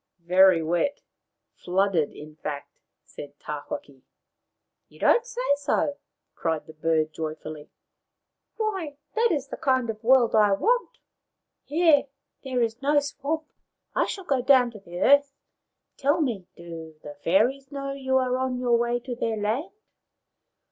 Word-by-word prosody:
" - - -59 0.2
Very 185 -3 +7
wet. 175 - 0 0.6
Flooded, 180 -4 +1
in 150 0 -11
fact," 145 -2 -5 0.3
said 145 0 -11
Tawhaki. 145 -2 -7 0.4
" - - -56
You - - -18
don't 475 0 +4
say - - -4
so! 285 0 0 0.2
" - - -57
cried 160 -2 -2
the 160 - -12
bird 155 0 0
joyfully. 155 -1 -6 0.4
" - - -58
Why, 380 -10 -2 0.2
that 460 +1 +2
is 280 -4 -1
the - - -6
kind 260 -4 +1
of 215 +1 -13
world 245 -1 +5
I 210 -2 +5
want. 480 - +1 0.7
Here 310 -2 +4 0.4
there 255 -3 0
is 230 +2 -3
no 290 +1 +4
swamp. 290 +2 -3 0.5
I - - +1
shall 390 - -5
go 270 -6 +1
down 250 -2 +5
to 215 - -11
the 175 -2 -9
earth. 280 0 +5 0.6
Tell 290 +4 +2
me, 230 - -1
do 165 -2 -9
the 145 - -8
fairies 255 - +2
know 275 -1 -4
you 265 -1 0
are 255 -1 +1
on 260 -1 -1
your 240 -2 +2
way 240 0 0
to 245 0 -5
their 225 -2 -1
land 225 - -1
245 Hz, 155 wpm, -26 LUFS, 175-280 Hz, 0.7 s, Very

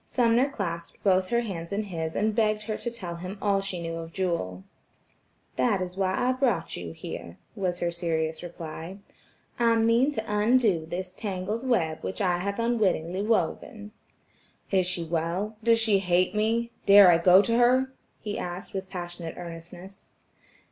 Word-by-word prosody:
Sumner 245 +2 +2
clasped 170 -9 -5
both 185 -2 +3
her 235 +2 +1
hands 170 -7 -5
in 205 +2 -1
his 165 -5 -4
and 215 +1 +1
begged 215 -1 +1
her 215 0 -3
to 235 - -3
tell 185 -8 -6
him 185 +4 -7
all 200 -1 +1
she 195 -2 -4
knew 165 0 -4
of 165 0 -7
Jewel. 165 - -2 0.9
"That 130 +9 +2
is 180 0 -4
why 190 -1 0
I 250 - +2
brought 245 -10 0
you 85 -1 -6
here," 85 +1 -8 0.2
was 180 -4 -2
her 175 - 0
serious 160 -2 -2
reply. 170 +1 -7 0.6
"I 230 -1 +4
mean 230 +5 +3
to 220 - -3
undo 210 -5 +2
this 180 +2 -4
tangled 205 +5 -4
web 160 -11 +1
which - - -5
I 180 -3 +1
have 200 +2 -3
unwittingly 195 -6 +1
woven." 210 0 -1 0.8
"Is 185 -2 +2
she 180 -2 -2
well? 170 +6 -2
does 230 0 +4
she 215 -3 +3
hate 180 0 +2
me? 225 +2 0 0.2
Dare 200 -2 +9
I 165 - +4
go 180 +3 +7
to 230 +2 +1
her?" 255 +2 +3 0.3
he 210 -1 -4
asked 180 +5 -6
with 190 -1 -4
passionate 175 -3 -6
earnestness. 175 +3 -10
190 Hz, 170 wpm, -27 LUFS, 170-220 Hz, 0.9 s, Dare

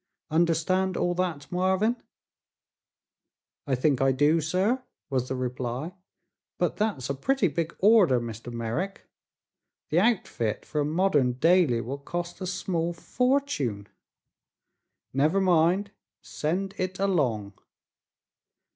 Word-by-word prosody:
Understand 170 +3 +1
all 175 - +1
that, 175 -5 -2
Marvin?" 190 +5 +2 1.7
"I 135 - +2
think 135 +1 +1
I 135 0 +4
do, 145 +5 +3
sir," 190 - +1 0.3
was 130 -2 0
the 130 - -1
reply; 125 +5 -3 0.6
"but - - 0
that's 210 - -1
a 140 - -1
pretty 235 - +1
big 165 +2 -3
order, 195 - +5
Mr. 115 0 -7
Merrick. 120 - -4 0.8
The 160 - +3
outfit 180 - 0
for 150 - -2
a - - 0
modern 150 -6 +2
daily 155 -3 +3
will 135 +5 -5
cost 175 +5 -5
a 185 - -3
small 175 -2 -2
fortune." 170 - -1 1.2
"Never 150 +8 +2
mind; 185 +2 +3 0.3
send 190 +6 -2
it 185 0 -2
along." 130 - 0
165 Hz, 115 wpm, -27 LUFS, 130-185 Hz, 1.7 s, order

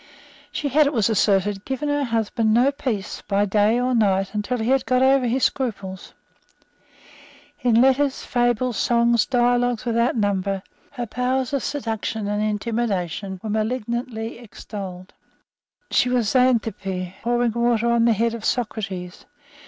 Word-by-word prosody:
She 290 - -2
had, 295 +2 +4
it 290 - -1
was 225 -3 +2
asserted, 200 -1 +1
given 265 +2 -3
her 290 -1 0
husband 225 -1 0
no 255 +4 +4
peace 230 -8 -4
by 200 0 +2
day 210 +3 +2
or 250 +1 0
by 235 - +3
night 195 0 0
till 250 +4 -2
he 230 +2 -1
had 270 -1 +3
got 255 0 +3
over 265 -1 +4
his 250 +3 0
scruples. 195 -8 -2 1.5
In 235 -2 +3
letters, 265 +2 +2
fables, 240 -1 0
songs, 235 -1 +2
dialogues 245 -2 +1
without 235 +1 +1
number, 200 -2 -1 0.3
her 245 -3 -4
powers 250 +3 -1
of 275 - +1
seduction 225 -5 -3
and 210 0 -1
intimidation 205 -4 -2
were 215 - -3
malignantly 230 +1 -3
extolled. 195 -5 -9 0.8
She 250 - +3
was 245 -4 +1
Xanthippe 215 -7 0
pouring 240 0 +1
water 235 0 +1
on 235 -1 +3
the 235 - +4
head 230 +2 0
of 230 -2 -6
Socrates. 195 -7 -3
235 Hz, 145 wpm, -22 LUFS, 205-250 Hz, 1.5 s, had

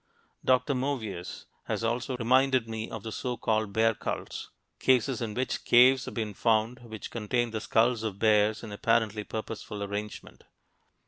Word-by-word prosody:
Dr. 130 +3 +3
Movius 120 -9 -3 0.2
has - - -2
also 120 +3 -1
reminded 130 0 +3
me 110 0 -4
of 110 -3 -7
the 110 - -5
so 125 +2 -3
called 110 -2 0
bear 115 +2 +3
cults - - -5 0.3
cases 130 -1 +2
in 110 -3 -3
which 130 +1 -2
caves 125 +2 +6
have - - -7
been 110 -3 -2
found 110 +3 +1
which 110 -3 -9
contain 120 +1 -1
the 110 -1 -3
skulls 115 +1 +2
of 110 -4 -3
bears 105 0 +3
in 110 - -7
apparently 110 0 +1
purposeful 105 -1 -5
arrangement. 100 +1 -6
115 Hz, 155 wpm, -28 LUFS, 110-125 Hz, 0.3 s, caves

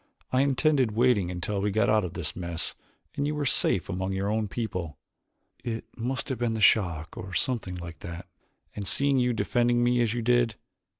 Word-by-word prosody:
"I 130 - +3
intended 135 -3 +2
waiting 115 -5 +3
until 90 +3 -2
we 105 - +1
got 110 +2 +2
out 110 -1 +3
of 90 - -4
this - - -2
mess 85 -2 -2 0.4
and 140 - 0
you 150 - -1
were 150 -1 -1
safe 95 -7 +2
among 95 0 -2
your 95 +1 -1
own 110 -1 0
people. 90 - -4 0.7
It 115 -2 -4
must 125 +3 -3
have 130 -4 -3
been 120 -2 0
the - - -2
shock 85 -6 +3
or 95 0 -7
something 115 -5 -1
like 85 -2 -8
that, 85 +2 -7 0.5
and 100 -2 -5
seeing 140 +8 +3
you 125 0 +2
defending 120 +2 +2
me 120 0 +3
as 115 -1 +1
you 120 - -2
did. 120 -1 +3
110 Hz, 195 wpm, -27 LUFS, 95-125 Hz, 0.7 s, I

